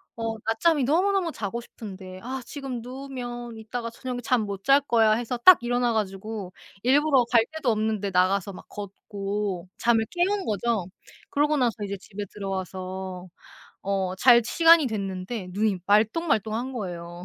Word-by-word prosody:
어 225 -1 -3
낮잠이 270 +7 +2
너무너무 355 +5 +2
자고 220 -3 -4
싶은데 190 -5 -10
'아 260 +4 -5
지금 270 -4 -6
누우면 245 -2 -7
이따가 230 +2 -5
저녁에 245 +2 -5
잠 245 0 +2
못 200 -1 -6
잘 275 +1 +6
거야.' 225 -5 +3
해서 240 +2 -2
딱 365 +9 +9
일어나 245 0 +1
가지고 205 -2 -4 0.3
일부러 275 0 +4
갈 230 -2 +5
데도 315 -6 0
없는데 215 -2 -1
나가서 190 +2 +2
막 - - -12
걷고 200 -1 -4
잠을 230 -2 +2
깨운 375 +3 0
거죠. 215 -1 0 0.5
그러고 295 +1 +2
나서 245 -5 +2
이제 200 0 -4
집에 205 +1 -7
들어와서 185 -1 -5 0.6
어 190 -2 -1
잘 240 +3 +7
시간이 330 +4 +6
됐는데 195 -2 -4
눈이 205 -1 0
말똥말똥한 220 - +1
거예요. 175 -6 -6
225 Hz, 315 characters per minute, -26 LUFS, 195-255 Hz, 0.6 s, 딱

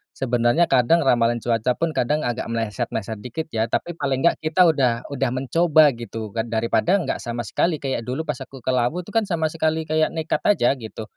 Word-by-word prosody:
sebenarnya 120 +4 +2
kadang 140 +6 +4
ramalan 120 -2 +2
cuaca 120 +1 +1
pun 165 +3 -1
kadang, 150 +2 0
agak 120 0 -2
meleset-meleset 115 -1 -3
dikit, 140 +9 -6
ya. 110 +1 0
Tapi 175 - -2
paling 135 -1 -1
enggak, 170 - +3
kita 160 +4 +3
udah 130 -7 +2
udah 135 -2 0
mencoba, 155 +3 +4
gitu 115 -2 -7
kan. 115 0 -2
Daripada 115 - +1
enggak 185 - -2
sama 120 0 -4
sekali, 160 +6 -1
kayak 135 -3 -1
dulu 130 +6 -2
pas 150 -4 -4
aku 135 -1 -10
ke 130 - 0
Lawu 125 +9 0
tuh 205 - -11
kan, 225 -2 +1
sama 160 -4 -1
sekali 160 0 0
kayak 155 0 +1
nekat 160 0 -1
aja, 195 -13 +4
gitu. 110 0 -8
130 Hz, 200 wpm, -22 LUFS, 120-160 Hz, -, kadang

